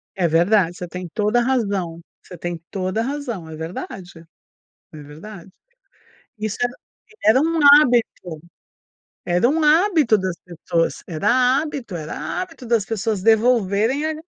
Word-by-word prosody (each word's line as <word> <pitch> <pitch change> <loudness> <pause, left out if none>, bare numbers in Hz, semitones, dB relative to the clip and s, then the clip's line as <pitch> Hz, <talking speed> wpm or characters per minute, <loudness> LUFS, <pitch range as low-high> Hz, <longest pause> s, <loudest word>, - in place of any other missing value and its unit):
É 180 -3 +1
verdade, 175 +2 +2
você 180 - -7
tem 180 +1 -7
toda 210 +3 +1
a - - +1
razão 200 -10 -1 0.2
você 180 - -12
tem 175 0 -5
toda 185 +2 -3
a - - -1
razão, 240 - -5
é 160 - -8
verdade 165 +1 -8 0.7
é - - -10
verdade. 170 +6 -12 0.9
Isso 215 -1 -4
era 245 0 0 0.5
era 220 +5 +6
um 330 +1 0 0.2
hábito 225 - -1 0.8
era 175 +6 +2
um 315 +4 0
hábito 310 - +4
das 185 -2 -3
pessoas, 170 -1 -2
era 170 +4 -2 0.3
hábito 280 - -6
era 160 - -5
hábito 330 -8 -8
das 230 -3 +1
pessoas 215 -2 -2
devolverem 225 +3 +2
a - - -12
205 Hz, 140 wpm, -21 LUFS, 175-245 Hz, 0.9 s, era